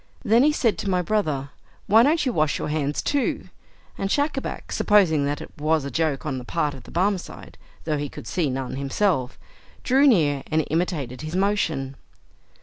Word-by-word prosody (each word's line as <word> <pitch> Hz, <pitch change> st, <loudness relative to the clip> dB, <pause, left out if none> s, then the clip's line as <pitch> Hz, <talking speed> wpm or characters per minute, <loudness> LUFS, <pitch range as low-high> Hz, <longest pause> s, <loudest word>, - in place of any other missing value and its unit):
Then 230 Hz, +3 st, +5 dB
he 300 Hz, +3 st, +5 dB
said 240 Hz, -7 st, +1 dB
to 200 Hz, -, -2 dB
my 180 Hz, -1 st, +1 dB
brother, 155 Hz, -9 st, -1 dB, 0.3 s
"Why 220 Hz, +3 st, +6 dB
don't 300 Hz, +5 st, +3 dB
you 255 Hz, -, 0 dB
wash 155 Hz, -4 st, +1 dB
your -, -, -4 dB
hands 150 Hz, -1 st, -1 dB
too?" 285 Hz, -2 st, -1 dB, 0.5 s
and 195 Hz, -, -1 dB
Schacabac, 285 Hz, +2 st, -2 dB
supposing 175 Hz, -9 st, +3 dB
that 145 Hz, 0 st, -2 dB
it -, -, -9 dB
was 155 Hz, -1 st, +1 dB
a 140 Hz, -, -5 dB
joke 150 Hz, -2 st, -1 dB
on 135 Hz, -4 st, -2 dB
the -, -, -8 dB
part 150 Hz, +3 st, -1 dB
of 130 Hz, -, -12 dB
the -, -, -12 dB
Barmecide 185 Hz, +1 st, -2 dB, 0.3 s
(though 155 Hz, -2 st, -1 dB
he 145 Hz, 0 st, -3 dB
could -, -, -10 dB
see 145 Hz, -, -1 dB
none 130 Hz, 0 st, -4 dB
himself), 140 Hz, -1 st, 0 dB, 0.5 s
drew 270 Hz, +3 st, +4 dB
near, 150 Hz, -, +3 dB
and 155 Hz, 0 st, +1 dB
imitated 155 Hz, -7 st, -2 dB
his 155 Hz, +2 st, -5 dB
motion. 165 Hz, -9 st, 0 dB
160 Hz, 185 wpm, -24 LUFS, 140-205 Hz, 0.5 s, Why